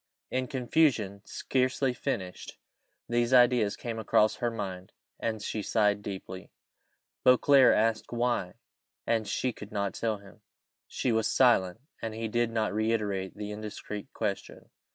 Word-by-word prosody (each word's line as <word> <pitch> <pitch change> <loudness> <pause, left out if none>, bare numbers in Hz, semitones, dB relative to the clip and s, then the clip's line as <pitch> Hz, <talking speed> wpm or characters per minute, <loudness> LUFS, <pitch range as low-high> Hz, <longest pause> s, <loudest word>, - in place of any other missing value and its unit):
In 130 0 -1
confusion, 120 -6 +1
scarcely 130 0 0
finished, 95 -6 -4 0.5
these 120 +1 +2
ideas 120 -4 +4
came 115 -2 -5
across 110 0 +2
her 120 - 0
mind, 95 -5 -6 0.3
and 110 -1 -2
she 110 - -3
sighed 105 -1 +1
deeply. 95 -2 -7 0.7
Beauclerc 130 +1 +6
asked 110 0 0
why, 120 -6 -1 0.5
and 115 -2 0
she 125 +4 -1
could 105 -1 -11
not 100 -2 -2
tell 110 -2 -1
him! 100 +1 -17 0.5
She 125 - -1
was 110 -1 +2
silent; 115 -6 +3 0.2
and 110 -1 -4
he 115 0 -3
did 120 +1 0
not 110 -2 -1
reiterate 105 -3 -1
the 105 0 -5
indiscreet 105 -1 -7
question. 105 -3 -5
110 Hz, 135 wpm, -29 LUFS, 100-120 Hz, 0.7 s, Beauclerc